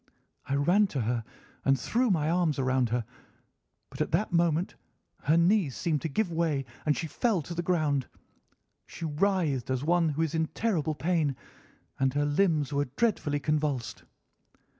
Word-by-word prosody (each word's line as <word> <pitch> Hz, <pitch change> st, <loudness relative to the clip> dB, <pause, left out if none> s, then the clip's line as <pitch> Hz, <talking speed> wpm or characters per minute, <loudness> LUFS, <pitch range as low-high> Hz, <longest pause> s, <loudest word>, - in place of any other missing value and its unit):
I 140 Hz, -, 0 dB
ran 180 Hz, +9 st, +3 dB
to 140 Hz, -8 st, -3 dB
her 115 Hz, +1 st, -1 dB, 0.4 s
and 135 Hz, -1 st, +3 dB
threw 245 Hz, +1 st, +1 dB
my 160 Hz, -6 st, +1 dB
arms 170 Hz, -2 st, +1 dB
round 130 Hz, -2 st, +1 dB
her, 120 Hz, 0 st, -1 dB, 0.9 s
but -, -, -6 dB
at -, -, 0 dB
that 185 Hz, +3 st, +1 dB
moment 170 Hz, 0 st, +2 dB, 0.5 s
her 155 Hz, +3 st, +4 dB
knees 170 Hz, -, +3 dB
seemed 155 Hz, -4 st, -1 dB
to 160 Hz, -, -2 dB
give 180 Hz, +5 st, 0 dB
way 160 Hz, -5 st, 0 dB, 0.2 s
and 150 Hz, -, +3 dB
she -, -, -2 dB
fell 190 Hz, +1 st, 0 dB
to 170 Hz, -, -7 dB
the 170 Hz, -, -2 dB
ground. 155 Hz, -7 st, 0 dB, 0.8 s
She 165 Hz, -, -7 dB
writhed 155 Hz, -5 st, 0 dB
as 130 Hz, 0 st, -1 dB
one 170 Hz, +1 st, +3 dB
who 155 Hz, +2 st, 0 dB
is 160 Hz, -1 st, -2 dB
in 160 Hz, -1 st, +1 dB
terrible 160 Hz, -9 st, 0 dB
pain, 155 Hz, -3 st, 0 dB, 0.6 s
and 135 Hz, 0 st, +1 dB
her 145 Hz, 0 st, +2 dB
limbs 150 Hz, -2 st, +1 dB
were 140 Hz, 0 st, +1 dB
dreadfully 175 Hz, -11 st, +1 dB
convulsed. 150 Hz, -4 st, -1 dB
155 Hz, 165 wpm, -28 LUFS, 140-175 Hz, 0.9 s, her